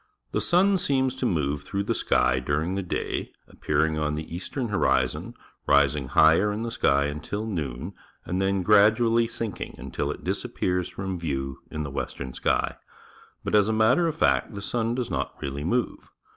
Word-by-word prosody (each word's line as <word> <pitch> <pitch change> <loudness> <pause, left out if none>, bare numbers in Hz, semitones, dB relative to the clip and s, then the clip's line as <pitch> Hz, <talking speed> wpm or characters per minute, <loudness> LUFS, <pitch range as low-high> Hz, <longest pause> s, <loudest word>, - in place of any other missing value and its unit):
— - - -48
The - - +1
sun 190 +2 +3
seems 130 -4 +1
to 130 -1 -1
move 75 -6 0
through 100 +7 -3
the - - 0
sky 60 +1 +2
during 75 +7 -1
the 100 - -1
day, 90 - -3 0.2
appearing 75 +1 0
on 75 0 0
the 80 +2 -6
eastern 120 +7 -4
horizon, 65 -10 0 0.3
rising 70 -1 +3
higher 80 +10 +5
in 105 +2 -3
the 115 - -3
sky 70 -10 +2
until 75 +9 -4
noon, 75 - -4 0.3
and 90 +3 -1
then 95 -1 +1
gradually 110 +3 +4
sinking 115 -4 -5
until - - -4
it - - -5
disappears 90 -1 -1
from 95 -2 -4
view 70 -4 -3
in 75 - -4
the 70 - -5
western 65 -1 -5
sky. - - 0 0.7
But, - - -3
as 105 0 +4
a - - +1
matter 115 +10 +4
of 160 - -2
fact, 135 - +1
the 100 - -5
sun 115 +1 -1
does 125 -2 -3
not - - -3
really 70 +1 -4
move. 120 +9 -1
95 Hz, 180 wpm, -26 LUFS, 75-110 Hz, 0.7 s, higher